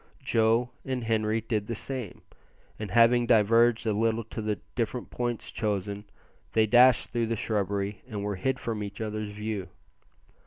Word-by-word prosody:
Joe 115 +2 +2
and 130 -2 -3
Henri 110 0 +1
did 110 -2 -2
the 115 - -3
same, 125 -4 -5 0.6
and 105 -2 -4
having 120 +3 +5
diverged 115 +1 +4
a 110 - +1
little 115 +2 +1
to 110 +1 -6
the 105 -1 -2
different 120 0 -3
points 120 -2 -3
chosen, 100 -1 -2 0.5
they 110 -1 +4
dashed 125 +3 +5
through 115 -1 0
the 115 - -1
shrubbery 100 -1 -2
and 105 -4 -5
were 100 -1 -2
hid 130 +8 0
from 115 -3 -4
each 100 -1 -6
other's 110 -1 -3
view. 105 -2 -4
110 Hz, 160 wpm, -28 LUFS, 105-115 Hz, 0.6 s, having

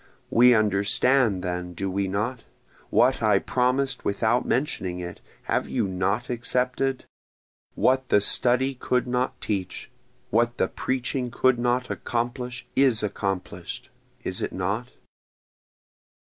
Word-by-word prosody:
We 125 +1 +6
understand 105 +1 +2
then 90 -1 -4
do 95 +2 -3
we 100 +1 -1
not? 110 +6 -2 0.5
What 130 -1 +3
I 105 -3 +4
promis'd 125 +4 +1
without 110 +4 +1
mentioning 95 -9 -1
it, 90 -1 -7 0.2
have - - -1
you - - 0
not 100 +6 -1
accepted? 125 +2 -1 0.7
What 130 0 +2
the - - +5
study 125 +6 +3
could 125 -1 0
not 125 +1 -1
teach 95 -4 -4 0.4
what 120 +2 +2
the - - +1
preaching 130 0 -2
could 130 0 +2
not 125 +1 0
accomplish 120 +1 -3
is 130 -6 +3
accomplish'd, 100 -3 -4 0.3
is - - -3
it - - -3
not? 100 +7 -2
120 Hz, 120 wpm, -25 LUFS, 100-125 Hz, 0.7 s, We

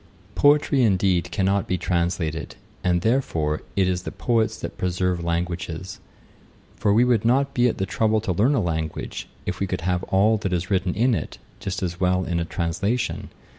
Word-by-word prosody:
Poetry, 145 0 +4
indeed, 95 -5 +2
cannot 100 0 +1
be 90 - 0
translated; 85 -3 -1 0.3
and, 90 -1 +2
therefore, 80 - 0
it 95 -2 +3
is 90 -1 0
the - - -6
poets 115 -2 0
that - - -6
preserve 90 -1 0
languages; 85 +1 -3 0.8
for 100 +3 +1
we 110 +4 +5
would 120 -3 +2
not 135 +4 +2
be 120 0 +3
at - - -3
the 95 - 0
trouble 110 +3 +1
to 105 - -2
learn 115 - +3
a 120 - +2
language, 80 -3 -3 0.2
if - - -3
we 100 - 0
could 90 -1 -3
have 90 +1 0
all 105 +4 +3
that 100 -3 -3
is 90 +2 -2
written 95 -2 +1
in 120 +4 +3
it - - -3 0.2
just 95 -1 -4
as 85 0 -3
well 90 0 +2
in 85 0 -1
a 85 - -1
translation. 90 +9 -2
95 Hz, 185 wpm, -24 LUFS, 85-110 Hz, 0.8 s, we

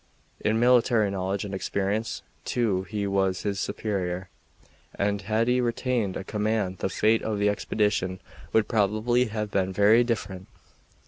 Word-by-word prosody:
In 110 +1 +1
military 120 -4 +4
knowledge 95 +1 -2
and 100 - -6
experience, 100 +3 -2 0.2
too, 100 -6 0
he 105 -1 -2
was 95 -1 0
his 100 -2 -1
superior, 95 -4 -3 0.7
and 100 0 0
had 110 +3 0
he 125 +1 +3
retained 120 -4 -1
a - - -5
command 105 -2 -1
the - - -1
fate 110 +4 +2
of 110 -1 -2
the 100 0 +2
expedition 105 -3 0 0.3
would 110 -1 +3
probably 110 +4 +2
have 105 -2 -4
been 95 -1 0
very 105 +5 +5
different. 95 -6 -3
105 Hz, 145 wpm, -26 LUFS, 95-110 Hz, 0.7 s, very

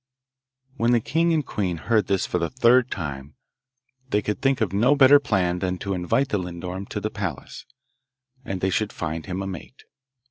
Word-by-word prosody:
When 120 +1 +2
the 120 - +4
king 165 +8 +1
and 155 -4 +1
queen 90 -7 -2
heard 110 +3 +1
this 95 -1 +1
for - - -1
the 85 - -1
third 125 0 +4
time 70 -5 -6 0.7
they 105 -3 +1
could 105 - -3
think 135 -1 +2
of 105 -5 -1
no 120 +8 +4
better 145 +1 +7
plan 90 -10 0
than 90 0 -2
to 100 +2 -3
invite 95 +10 0
the 105 - 0
lindorm 90 +2 -6
to - - -4
the - - -3
palace, - - -6 0.8
and 95 -5 -5
they 95 - +1
should 110 +2 0
find 80 +1 -5
him 95 +1 -3
a - - -5
mate. 95 +8 -9
100 Hz, 190 wpm, -24 LUFS, 90-125 Hz, 0.8 s, better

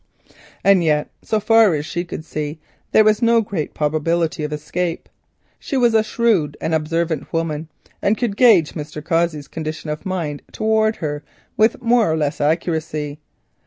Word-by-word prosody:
And 195 -3 +5
yet 150 -2 +1
so 220 - 0
far 220 -4 +5
as 150 0 -3
she 175 +2 -3
could 165 -2 -7
see 150 -1 -4 0.3
there 215 - +6
was 215 +1 +3
no 230 0 +4
great 195 -8 -4
probability 155 +2 0
of 150 - -3
escape. 165 +3 -3 0.6
A 240 -5 +3
shrewd 210 -11 +1
and 160 - -2
observant 160 +1 -1
woman, 165 -1 -2 0.4
she 205 - +3
could 225 -3 -2
gauge 205 -10 +5
Mr. 150 -1 -7
Cossey's 165 -3 0
condition 155 0 -5
of 150 - -5
mind 165 -6 -3
towards 220 0 +1
herself 145 -2 -5 0.3
with 220 +2 +2
more 230 -6 +3
or 160 - 0
less 150 -1 -1
accuracy. 155 -1 -1
165 Hz, 155 wpm, -20 LUFS, 150-215 Hz, 0.6 s, there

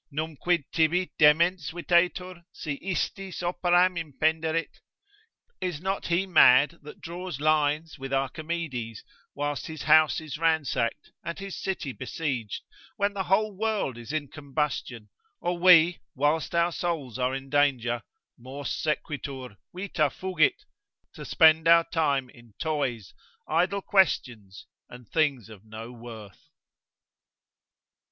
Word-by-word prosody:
Numquid 160 +2 -1
tibi 170 +3 +1
demens 160 +2 +4
videtur, 175 +1 0
si 145 -3 -5
istis 190 0 -3
operam 175 +1 +2
impenderit? 160 +1 -1 0.8
Is 180 -5 -2
not 190 +3 -3
he 175 +3 +1
mad 150 -3 +5
that 150 +6 -12
draws 175 -3 -6
lines 155 +1 +1
with 135 0 -6
Archimedes, 135 -4 -3 0.3
whilst 145 0 -3
his 155 -1 -7
house 155 -3 +5
is 155 -2 -7
ransacked, 155 -5 0
and 170 +1 -5
his 195 -1 -6
city 185 -8 -3
besieged, 130 -4 -4 0.3
when 200 0 +1
the 195 -2 -3
whole 210 +2 +1
world 215 - -1
is 120 +3 -8
in 155 -2 -2
combustion, 140 -6 -4 0.3
or 175 0 -2
we 175 -1 +6 0.2
whilst 150 +5 0
our 170 +1 +3
souls 155 -9 -3
are 125 +1 0
in 135 0 -6
danger, 130 -5 +2 0.4
(mors 130 +3 -6
sequitur, 140 -4 -3 0.2
vita 180 -5 -1
fugit) 185 - 0 0.5
to - - -9
spend 160 0 +5
our 170 0 +7
time 140 -5 +1
in 120 -3 -19
toys, 140 - -2 0.3
idle 180 +5 +1
questions, 120 - 0 0.2
and 125 -2 -12
things 145 -8 0
of 110 -3 -13
no 110 +2 -9
worth? 115 -4 -12
155 Hz, 125 wpm, -27 LUFS, 135-175 Hz, 0.8 s, our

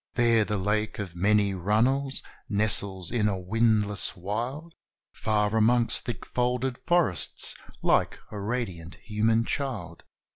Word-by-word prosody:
There 115 -2 +4
the 105 0 -2
lake 105 +3 -1
of 95 -5 -6
many 100 +2 +2
runnels 120 +9 +1 0.3
nestles 100 -3 +3
in 115 -3 +1
a 100 -2 -1
windless 105 +1 +1
wild 120 - -4 0.4
Far 105 0 0
amongst 115 +2 +2
thick 120 -6 -5
folded 125 +1 -1
forests, 165 - +1 0.3
like - - +2
a 105 - -6
radiant 100 -6 -4
human 110 +2 0
child. 105 - -4
105 Hz, 120 wpm, -27 LUFS, 100-120 Hz, 0.4 s, There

